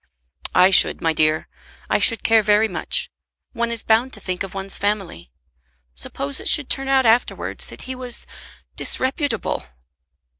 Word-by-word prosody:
"I 180 Hz, +1 st, +6 dB
should, 185 Hz, -, +7 dB
my 165 Hz, -1 st, 0 dB
dear. 155 Hz, 0 st, +1 dB, 0.4 s
I -, -, +1 dB
should 230 Hz, -3 st, +2 dB
care 225 Hz, -1 st, +4 dB
very 210 Hz, +1 st, +3 dB
much. 185 Hz, -, -2 dB, 0.4 s
One 235 Hz, 0 st, -2 dB
is 230 Hz, -1 st, -1 dB
bound 230 Hz, +4 st, +2 dB
to -, -, -7 dB
think 185 Hz, -1 st, -4 dB
of 195 Hz, 0 st, -5 dB
one's 195 Hz, 0 st, -2 dB
family. 195 Hz, -, -3 dB, 0.6 s
Suppose 140 Hz, -, -3 dB
it -, -, -5 dB
should 290 Hz, -3 st, +2 dB
turn 270 Hz, 0 st, -3 dB
out 265 Hz, -1 st, +3 dB
afterwards 230 Hz, +2 st, 0 dB
that -, -, -10 dB
he 260 Hz, -, -6 dB
was 255 Hz, -1 st, -5 dB, 0.5 s
disreputable!" 275 Hz, +3 st, -1 dB
220 Hz, 155 wpm, -21 LUFS, 185-250 Hz, 0.6 s, should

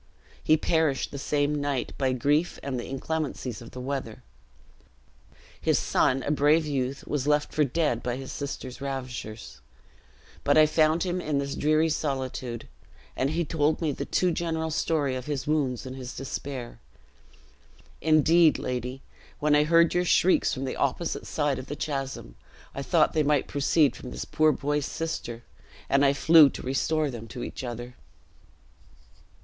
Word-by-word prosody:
He 155 Hz, -, +4 dB
perished 155 Hz, -4 st, +1 dB
the 140 Hz, -, -6 dB
same 145 Hz, +1 st, 0 dB
night, 145 Hz, -3 st, -2 dB
by 130 Hz, -2 st, 0 dB
grief, 145 Hz, +7 st, +1 dB
and 135 Hz, -3 st, -3 dB
the -, -, -6 dB
inclemencies 135 Hz, -3 st, -3 dB
of 115 Hz, -, -10 dB
the 125 Hz, -, -9 dB
weather. 130 Hz, -4 st, -5 dB, 1.4 s
His -, -, +2 dB
son, 130 Hz, 0 st, +1 dB
a -, -, -1 dB
brave 150 Hz, +2 st, +3 dB
youth, 135 Hz, -2 st, -2 dB
was 145 Hz, -2 st, -2 dB
left 150 Hz, 0 st, +1 dB
for 155 Hz, -, +3 dB
dead 140 Hz, -4 st, 0 dB
by 125 Hz, -1 st, -2 dB
his 135 Hz, 0 st, -7 dB
sister's 140 Hz, -2 st, -6 dB
ravishers; 125 Hz, -, -6 dB, 0.8 s
but -, -, +3 dB
I 155 Hz, -, +8 dB
found 155 Hz, +1 st, +2 dB
him 180 Hz, -1 st, -2 dB
in 150 Hz, -3 st, -1 dB
this 140 Hz, 0 st, -2 dB
dreary 155 Hz, +2 st, +2 dB
solitude, 130 Hz, -5 st, -3 dB, 0.5 s
and 130 Hz, -, 0 dB
he 165 Hz, +2 st, -1 dB
told 150 Hz, 0 st, +1 dB
me 160 Hz, -3 st, 0 dB
the -, -, -4 dB
too 180 Hz, -1 st, +1 dB
general 160 Hz, -1 st, -2 dB
story 150 Hz, -3 st, 0 dB
of 125 Hz, +1 st, -6 dB
his 145 Hz, -2 st, -3 dB
wounds 140 Hz, -5 st, 0 dB
and 130 Hz, 0 st, -6 dB
his 130 Hz, -2 st, -7 dB
despair. 135 Hz, -2 st, -6 dB, 1.2 s
Indeed, 160 Hz, 0 st, +5 dB
lady, 125 Hz, +1 st, -4 dB, 0.3 s
when 150 Hz, 0 st, +2 dB
I 150 Hz, 0 st, +4 dB
heard 165 Hz, +1 st, +4 dB
your 180 Hz, 0 st, +1 dB
shrieks 180 Hz, +1 st, +3 dB
from 135 Hz, -1 st, -3 dB
the 130 Hz, -, -4 dB
opposite 160 Hz, +5 st, -1 dB
side 145 Hz, -3 st, 0 dB
of 130 Hz, -, -8 dB
the 145 Hz, -, -4 dB
chasm, 135 Hz, -, -4 dB, 0.4 s
I 140 Hz, -, -5 dB
thought 155 Hz, +3 st, +2 dB
they 155 Hz, -, +2 dB
might 145 Hz, -2 st, +2 dB
proceed 145 Hz, +1 st, +2 dB
from 125 Hz, -, -9 dB
this -, -, -5 dB
poor 155 Hz, 0 st, +3 dB
boy's 145 Hz, 0 st, -1 dB
sister, 120 Hz, -8 st, -4 dB, 0.4 s
and 140 Hz, +1 st, +3 dB
I 140 Hz, 0 st, +5 dB
flew 155 Hz, +1 st, +7 dB
to -, -, -8 dB
restore 150 Hz, +3 st, 0 dB
them 115 Hz, -2 st, -8 dB
to 120 Hz, +2 st, -7 dB
each -, -, -6 dB
other." 120 Hz, 0 st, -6 dB
140 Hz, 165 wpm, -27 LUFS, 130-155 Hz, 1.4 s, I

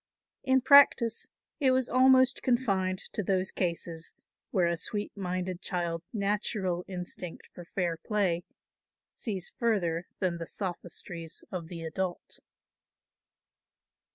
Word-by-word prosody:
In 265 Hz, -1 st, +4 dB
practice 250 Hz, -4 st, +6 dB, 0.3 s
it 275 Hz, -3 st, +4 dB
was 255 Hz, -1 st, +3 dB
almost 260 Hz, +1 st, +5 dB
confined 195 Hz, -7 st, +1 dB, 0.2 s
to -, -, 0 dB
those 190 Hz, -1 st, 0 dB
cases 170 Hz, -2 st, -3 dB, 0.4 s
where 180 Hz, -3 st, +2 dB
a 170 Hz, 0 st, +2 dB
sweet 205 Hz, +5 st, -3 dB
minded 185 Hz, -1 st, -3 dB
child's 170 Hz, -2 st, -2 dB
natural 200 Hz, -3 st, 0 dB
instinct 180 Hz, -2 st, -6 dB
for 175 Hz, -, -10 dB
fair 175 Hz, -2 st, -1 dB
play 185 Hz, -4 st, 0 dB, 0.7 s
sees 195 Hz, -6 st, -3 dB
further 180 Hz, -7 st, +1 dB
than 180 Hz, -3 st, -1 dB
the 165 Hz, -, -5 dB
sophistries 175 Hz, -3 st, -5 dB
of 175 Hz, -3 st, -4 dB
the 165 Hz, -1 st, -7 dB
adult. 175 Hz, +2 st, -3 dB
185 Hz, 115 wpm, -30 LUFS, 170-215 Hz, 0.7 s, practice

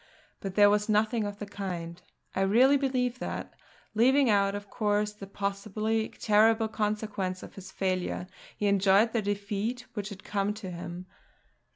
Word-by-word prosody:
But 195 Hz, -1 st, -5 dB
there 205 Hz, -1 st, +7 dB
was 210 Hz, +1 st, +1 dB
nothing 215 Hz, +1 st, +2 dB
of 205 Hz, 0 st, -5 dB
the 210 Hz, -, -5 dB
kind; 180 Hz, -4 st, -6 dB, 0.3 s
I 190 Hz, -, +1 dB
really 240 Hz, +8 st, +5 dB
believe 255 Hz, -3 st, 0 dB
that, -, -, -5 dB, 0.4 s
leaving 255 Hz, +3 st, +4 dB
out 200 Hz, -1 st, +3 dB
of 205 Hz, 0 st, -6 dB
course 210 Hz, 0 st, 0 dB
the 200 Hz, -2 st, -10 dB
possibly 215 Hz, +3 st, -2 dB
terrible 220 Hz, +1 st, +3 dB
consequences 210 Hz, -3 st, -2 dB
of -, -, -10 dB
his 190 Hz, -1 st, -10 dB
failure, 185 Hz, -2 st, -1 dB, 0.3 s
he 210 Hz, -, -1 dB
enjoyed 200 Hz, +2 st, +4 dB
the 230 Hz, -, +1 dB
defeat 205 Hz, +4 st, -2 dB
which 205 Hz, -2 st, -4 dB
had 195 Hz, -2 st, -10 dB
come 205 Hz, 0 st, -1 dB
to 200 Hz, -4 st, -7 dB
him. 175 Hz, +1 st, -7 dB
205 Hz, 160 wpm, -29 LUFS, 195-220 Hz, 0.4 s, there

